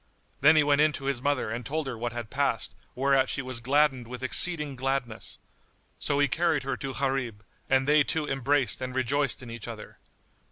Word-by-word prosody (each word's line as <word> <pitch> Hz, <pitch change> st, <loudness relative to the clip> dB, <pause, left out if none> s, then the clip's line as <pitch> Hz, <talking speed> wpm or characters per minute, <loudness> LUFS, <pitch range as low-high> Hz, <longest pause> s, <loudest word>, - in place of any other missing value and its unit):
Then 155 Hz, +3 st, +6 dB
he 155 Hz, -, +6 dB
went 145 Hz, 0 st, +3 dB
in 155 Hz, 0 st, +4 dB
to 135 Hz, -, -6 dB
his 135 Hz, -3 st, -1 dB
mother 140 Hz, -5 st, 0 dB
and 120 Hz, +2 st, -4 dB
told 155 Hz, +6 st, -2 dB
her 130 Hz, -3 st, -4 dB
what 120 Hz, +1 st, -3 dB
had 120 Hz, -1 st, -6 dB
passed; 135 Hz, -6 st, -1 dB, 0.2 s
whereat 135 Hz, 0 st, +3 dB
she 140 Hz, -, -3 dB
was 130 Hz, -2 st, -5 dB
gladdened 135 Hz, 0 st, +2 dB
with 125 Hz, +1 st, -7 dB
exceeding 150 Hz, +1 st, +1 dB
gladness: 130 Hz, -3 st, -2 dB, 0.6 s
so 140 Hz, -, 0 dB
he 145 Hz, 0 st, +4 dB
carried 160 Hz, 0 st, +1 dB
her 135 Hz, 0 st, -2 dB
to 135 Hz, -1 st, -4 dB
Gharib, 130 Hz, -6 st, -1 dB, 0.3 s
and 135 Hz, 0 st, +3 dB
they 150 Hz, 0 st, +5 dB
two 155 Hz, +1 st, -1 dB
embraced 135 Hz, -3 st, 0 dB
and 130 Hz, 0 st, -4 dB
rejoiced 130 Hz, 0 st, +1 dB
in 120 Hz, -, -8 dB
each 115 Hz, -1 st, -7 dB
other. 115 Hz, -2 st, -9 dB
135 Hz, 200 wpm, -28 LUFS, 125-145 Hz, 0.6 s, Then